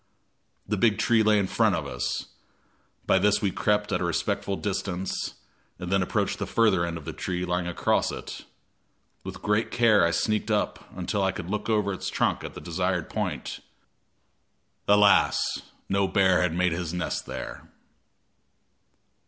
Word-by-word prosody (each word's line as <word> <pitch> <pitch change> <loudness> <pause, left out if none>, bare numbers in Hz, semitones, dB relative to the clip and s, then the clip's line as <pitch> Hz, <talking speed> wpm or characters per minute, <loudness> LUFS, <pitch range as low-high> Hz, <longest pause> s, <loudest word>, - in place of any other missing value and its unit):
The 105 - -1
big 105 +2 +3
tree 115 -2 +3
lay 105 -1 +4
in 100 - +2
front 110 0 +2
of 80 -3 -3
us; 60 -3 -3 0.8
by - - +4
this 105 +2 +3
we 100 -4 0
crept 105 +1 0
at 90 - 0
a - - 0
respectful 85 +3 -1
distance, 95 -2 -3 0.4
and 90 0 -6
then 95 -1 +3
approached 90 - -1
the - - -3
further 105 -6 +3
end 85 -1 -4
of 80 - -10
the - - -5
tree 90 0 -3
lying 90 0 -1
across 90 - +1
it. - - -8 0.8
With - - -8
great 105 +1 +1
care 115 -5 +4
I 85 - +4
sneaked 105 +5 0
up 105 -1 -1
until 95 +3 -1
I 95 0 +2
could 90 0 -6
look 105 +2 -3
over 105 -2 +1
its - - -4
trunk - - 0
at - - -7
the - - -8
desired - - -2
point. - - -3 1.3
Alas! 105 0 +5 0.5
no 100 0 +1
bear 95 -1 +3
had 90 -2 0
made 90 0 +2
his 85 0 -3
nest 90 - -3
there. - - -7
95 Hz, 165 wpm, -26 LUFS, 90-105 Hz, 1.3 s, Alas